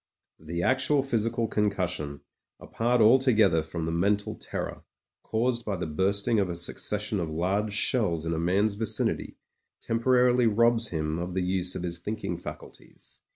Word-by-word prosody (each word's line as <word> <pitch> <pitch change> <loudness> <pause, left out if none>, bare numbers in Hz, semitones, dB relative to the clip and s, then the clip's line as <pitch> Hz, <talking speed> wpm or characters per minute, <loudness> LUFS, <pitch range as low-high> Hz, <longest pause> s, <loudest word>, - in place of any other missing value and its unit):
The 85 +2 -4
actual 130 +4 +2
physical 115 -2 -1
con 105 -1 +1
cussion, 90 -7 -3 0.4
apart 120 +1 0
altogether 110 -7 +4
from 80 +1 -5
the 80 - -2
mental 100 +5 0
terror, - - -6 0.4
caused 120 +1 -1
by 105 -3 -2
the 90 - -4
bursting 100 +7 +1
of 95 -2 0
a 85 - -3
succession 105 +4 0
of 85 -3 -3
large 95 +6 -1
shells 100 -7 +2
in 85 - -1
a 80 - -2
man's 95 +5 +1
vicinity, 110 +1 -1 0.4
temporarily 125 +1 +2
robs 115 +1 +3
him 80 -2 -3
of 90 +1 -5
the 95 - 0
use 90 0 -1
of - - -4
his 85 -1 -3
thinking 105 +5 -4
faculties. - - -11
100 Hz, 155 wpm, -27 LUFS, 85-115 Hz, 0.4 s, altogether